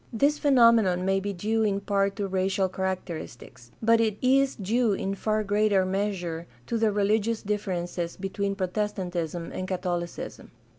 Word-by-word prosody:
This 285 +6 +2
phenomenon 230 -9 +4
may 195 0 +2
be 200 +1 -3
due 215 +4 -1
in 205 -2 +1
part 200 0 0
to 205 -2 -2
racial 190 0 +1
characteristics; 180 -10 -5
but 230 +1 +5
it 215 -2 0
is 270 +1 +3
due 220 +2 +1
in 195 0 -2
far 215 +2 0
greater 205 -1 +2
measure 185 -4 -2 0.2
to 230 - -1
the 220 -1 +3
religious 210 +2 +1
differences 180 -4 -3
between 200 +1 -2
Protestantism 180 -4 -3
and 185 - -4
Catholicism. 175 -2 -4
200 Hz, 145 wpm, -27 LUFS, 185-215 Hz, 0.2 s, but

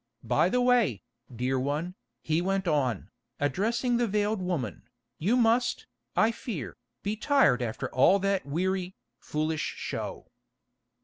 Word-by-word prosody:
By - - +2
the 250 - +2
way, 245 - +3 0.3
dear 125 +2 -1
one," 150 +7 -2 0.3
he 160 +1 +1
went 195 0 0
on, 130 - 0 0.3
addressing 225 - +1
the 240 -1 +1
veiled 210 0 0
woman, 170 - -3 0.3
"you 210 +10 +2
must, 235 +1 +2 0.3
I 225 - +4
fear, 205 - -6 0.3
be 205 +2 -1
tired 260 - +3
after 115 -2 -3
all 155 +10 +5
that 195 -1 0
weary, 185 +5 -2 0.2
foolish 155 0 -2
show." - - -5
185 Hz, 130 wpm, -28 LUFS, 145-220 Hz, 0.3 s, all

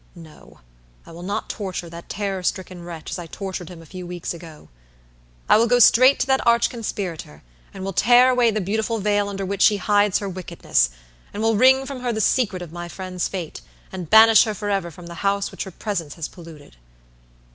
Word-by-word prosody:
No; 160 - -15 0.4
I - - -13
will 170 +1 -10
not 200 +3 -3
torture 190 -4 -5
that 170 0 -11
terror 195 -2 -3
stricken 180 0 -3
wretch 170 -2 -8
as - - -4
I 170 - -7
tortured 185 -1 -6
him 170 -2 -11
a - - -16
few 180 +2 -9
weeks 175 0 -5
ago. 165 -3 -12 0.8
I - - +6
will 230 +2 +3
go 245 +1 +4
straight 255 +3 +6
to - - +2
that 265 0 +2
arch 235 0 +4
conspirator, 180 - -6 0.3
and 190 - -9
will 195 0 -4
tear 245 +6 +5
away 245 -2 +3
the 215 -1 -1
beautiful 220 +4 -1
veil 205 -1 0
under 195 -1 -4
which 200 +1 -4
she 210 - +5
hides 205 0 +2
her 200 - -4
wickedness, 180 - -1 0.5
and 210 - -3
will 225 0 +2
wring 260 +4 +5
from 270 -1 -6
her 245 -1 -2
the 220 - -3
secret 205 -4 +1
of 170 - -11
my 175 0 -7
friend's 185 0 -4
fate, 180 -5 -6 0.3
and 180 -4 -7
banish 220 0 +7
her 215 -2 -3
forever 200 -4 -2
from 170 +2 -13
the 170 -1 -9
house 200 0 0
which - - -5
her - - -7
presence 175 -6 -4
has 165 -3 -5
polluted." 160 - -14
195 Hz, 210 wpm, -22 LUFS, 175-220 Hz, 0.8 s, banish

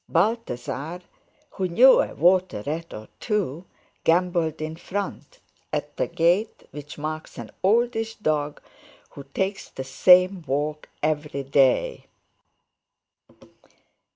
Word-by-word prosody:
Balthasar, 165 - -1 0.5
who 190 -2 -2
knew 245 +10 +7
a - - -4
water 180 - +2
rat 165 +3 -4
or 110 0 -9
two, 185 - -2 0.4
gambolled 170 -2 +1
in 155 +1 -4
front, 200 - -6 0.3
at - - -3
the - - 0
gait 175 +7 +1
which 145 0 -9
marks 155 +1 -5
an - - -8
oldish 225 +2 +1
dog 150 -6 -1 0.5
who 140 - -10
takes 195 +1 -2
the 135 - -6
same 180 +7 +5
walk 150 +3 -2
every 150 -2 -1
day. 140 - +2
165 Hz, 110 wpm, -24 LUFS, 150-195 Hz, 0.5 s, knew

